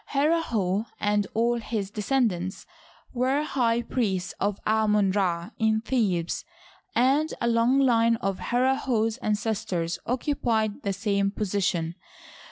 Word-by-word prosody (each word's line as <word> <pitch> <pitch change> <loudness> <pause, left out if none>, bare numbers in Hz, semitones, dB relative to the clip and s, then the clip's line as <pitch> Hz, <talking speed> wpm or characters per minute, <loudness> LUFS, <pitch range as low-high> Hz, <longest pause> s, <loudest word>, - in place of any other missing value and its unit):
Herihor 235 - +1
and 205 -1 +1
all 235 +1 +2
his 215 -3 -3
descendants 210 -5 -1 0.5
were 260 +4 +1
high 240 -5 +1
priests 195 -7 -1
of 200 0 -1
Amon 210 -2 +3
Ra 180 -4 -1
in 220 -1 +2
Thebes, 200 -9 0 0.5
and 270 +6 +3
a 235 - 0
long 235 +3 +3
line 230 -4 +4
of 195 -3 -3
Herlhor's 245 -3 +1
ancestors 210 -7 -2
occupied 235 -5 0
the 200 - -1
same 200 0 0
position. 185 -5 -1
220 Hz, 115 wpm, -26 LUFS, 200-245 Hz, 0.5 s, line